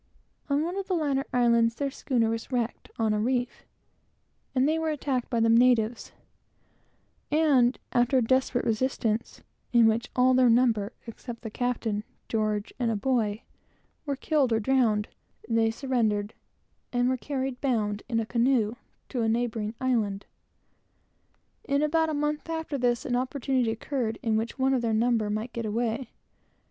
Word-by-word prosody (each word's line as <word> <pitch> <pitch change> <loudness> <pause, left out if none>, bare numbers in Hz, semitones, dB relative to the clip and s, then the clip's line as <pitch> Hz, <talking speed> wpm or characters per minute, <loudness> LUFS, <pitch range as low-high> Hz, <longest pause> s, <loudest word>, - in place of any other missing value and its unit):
On 285 +2 +2
one 345 +3 -3
of 395 -1 -3
the 375 - 0
latter 280 -4 0
islands, 235 -2 +3
their 280 +2 -2
schooner 235 -5 0
was 230 +3 -5
wrecked 240 -2 -2
on 220 -2 +1
a 210 - 0
reef, 245 +2 -2 0.9
and 260 +2 +3
they 315 +1 +1
were 320 0 -1
attacked 275 -4 -2
by 235 - 0
the 225 - +3
natives, 230 -1 +3 1.2
and, 280 -5 +3
after 245 +2 +3
a 250 - +3
desperate 260 +1 +1
resistance, 230 -1 -1 0.3
in 235 -2 +6
which 225 +1 +1
all 255 +1 +4
their 255 -1 +5
number 230 -3 +3
except 230 +1 -9
the 220 - -5
captain, 225 -3 -2 0.2
George, 215 -1 -1
and 240 -2 +1
a 225 - 0
boy, 220 -2 0 0.6
were 285 -2 -2
killed 280 -2 +1
or 225 - +3
drowned, 225 -3 +2 0.4
they 225 -1 +2
surrendered, 225 -4 -1 0.6
and 245 0 +1
were 260 - +2
carried 265 -1 -4
bound, 215 -6 0
in 230 -2 +1
a 225 - -1
canoe, 235 -2 +2 0.4
to 250 - -2
a 225 - +1
neighboring 225 -1 -1
island. 220 -6 0 1.4
In 280 +1 +1
about 320 +1 +2
a 310 - -1
month 295 +2 -2
after 320 -2 -3
this, 245 -3 0
an 245 - 0
opportunity 255 -1 0
occurred 225 0 -2
by 230 - -1
which 220 +3 -1
one 265 0 +2
of 255 - +1
their 225 -2 0
number 225 -2 +1
might 215 +3 -3
get 230 -2 -3
away. 230 +3 -2
240 Hz, 160 wpm, -27 LUFS, 225-265 Hz, 1.4 s, in